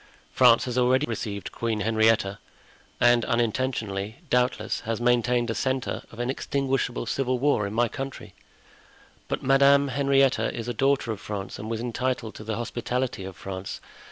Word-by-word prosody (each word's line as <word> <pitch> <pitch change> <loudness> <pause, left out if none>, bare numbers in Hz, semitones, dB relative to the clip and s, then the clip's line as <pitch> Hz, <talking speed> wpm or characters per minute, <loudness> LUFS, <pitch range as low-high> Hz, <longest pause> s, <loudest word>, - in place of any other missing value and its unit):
France 120 -2 +6
has 125 0 -1
already 130 +3 +3
received 105 -5 -4
Queen 115 -2 -2
Henrietta, 110 -1 +2 0.6
and, 120 -1 +5
unintentionally, 115 -3 -1 0.2
doubtless, 125 0 +1
has 115 -1 -3
maintained 120 0 +2
a - - -1
centre 130 +1 -1
of 115 - -12
inextinguishable 130 0 -1
civil 130 +1 0
war 125 -6 +2
in 100 - -6
my 120 +1 +3
country. 135 -6 -7 0.9
But - - -3
Madame 140 +1 +5
Henrietta 135 0 +2
is 115 -1 -5
a 120 - -2
daughter 135 -3 +1
of 105 - -5
France 100 -2 -5
and 110 - -6
was 115 0 -2
entitled 120 -1 -2
to - - -9
the 110 0 -3
hospitality 120 -2 -3
of 95 -1 -8
France. 95 0 -6
120 Hz, 155 wpm, -26 LUFS, 110-130 Hz, 0.9 s, France